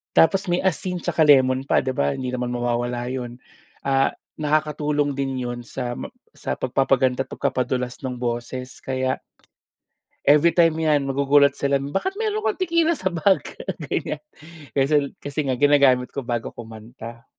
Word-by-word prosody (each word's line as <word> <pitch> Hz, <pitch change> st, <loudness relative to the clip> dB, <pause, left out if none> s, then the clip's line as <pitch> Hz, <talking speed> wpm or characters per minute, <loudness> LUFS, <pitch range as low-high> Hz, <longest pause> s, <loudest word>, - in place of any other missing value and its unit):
Tapos 190 Hz, +4 st, +5 dB
may 175 Hz, -, +2 dB
asin 185 Hz, -1 st, -1 dB
tsaka 165 Hz, -, +1 dB
lemon 130 Hz, -3 st, +5 dB
pa, 135 Hz, -, +2 dB
'di 130 Hz, -1 st, -2 dB
ba? 70 Hz, -7 st, +1 dB
Hindi 125 Hz, -, -3 dB
naman 125 Hz, -1 st, -2 dB
mawawala 120 Hz, 0 st, -1 dB
'yon, 125 Hz, -1 st, -5 dB, 0.5 s
ah, 135 Hz, 0 st, +3 dB, 0.2 s
nakakatulong 150 Hz, -1 st, 0 dB
din 135 Hz, -1 st, -2 dB
'yon 120 Hz, -1 st, -4 dB
sa, 120 Hz, 0 st, -4 dB
ma -, -, -7 dB, 0.2 s
sa -, -, -4 dB
pagpapaganda 130 Hz, 0 st, +2 dB
at -, -, -26 dB
pagpapadulas 125 Hz, 0 st, -1 dB
ng 125 Hz, -2 st, -4 dB
boses, 125 Hz, +1 st, -4 dB
kaya 130 Hz, 0 st, -1 dB, 1.0 s
everytime 165 Hz, +2 st, +5 dB
yan, 150 Hz, -2 st, +3 dB
magugulat 140 Hz, +1 st, +4 dB
sila, 140 Hz, -1 st, +1 dB
"Bakit 195 Hz, -, -2 dB
meron 430 Hz, 0 st, -2 dB
kang -, -, 0 dB
tequila 335 Hz, -2 st, +2 dB
sa 190 Hz, -, -1 dB
bag," 185 Hz, +3 st, +2 dB, 0.5 s
ganyan. -, -, -2 dB, 0.5 s
Kasi 140 Hz, +3 st, +1 dB
kasi 145 Hz, +1 st, -6 dB
nga, 130 Hz, -, 0 dB
ginagamit 140 Hz, -3 st, +4 dB
ko 140 Hz, -, -3 dB
bago 120 Hz, -2 st, -3 dB
kumanta. 115 Hz, +1 st, -10 dB
135 Hz, 150 wpm, -23 LUFS, 125-150 Hz, 1.0 s, Tapos